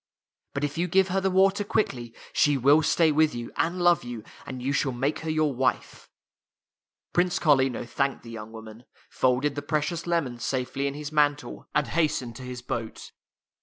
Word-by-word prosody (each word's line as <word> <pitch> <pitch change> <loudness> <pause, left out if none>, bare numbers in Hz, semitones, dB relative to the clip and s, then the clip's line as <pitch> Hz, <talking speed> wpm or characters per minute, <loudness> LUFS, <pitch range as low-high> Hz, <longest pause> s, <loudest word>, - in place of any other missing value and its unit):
But 140 - -2
if 145 +3 -2
you 175 - +1
give 190 +2 +3
her 190 +1 +1
the 190 - +1
water 195 +2 +3
quickly, 125 - -2 0.2
she 145 -1 +3
will 140 +5 +5
stay 160 0 +3
with 155 -3 +3
you, 120 -1 -6
and 170 +2 0
love 175 -1 +4
you, 120 -3 -7 0.2
and 130 -2 -6
you 135 +3 -1
shall 140 -2 0
make 135 +5 -1
her 160 - -5
your 155 -2 +1
wife." 130 +1 -2 1.0
Prince 180 0 +2
Carlino 135 -6 +2
thanked 135 +3 -1
the 115 - -10
young 110 -1 -8
woman, 110 +1 -11 0.3
folded 130 +3 +1
the 145 - -4
precious 155 +4 -2
lemons 140 -9 -1
safely 130 +1 -1
in 140 - -4
his 150 0 -6
man 145 -1 +4
tle, 145 - -10
and 150 - +3
hastened 150 -6 0
to - - -10
his 125 -1 -7
boat. 120 -3 -5
145 Hz, 190 wpm, -26 LUFS, 125-160 Hz, 1.0 s, will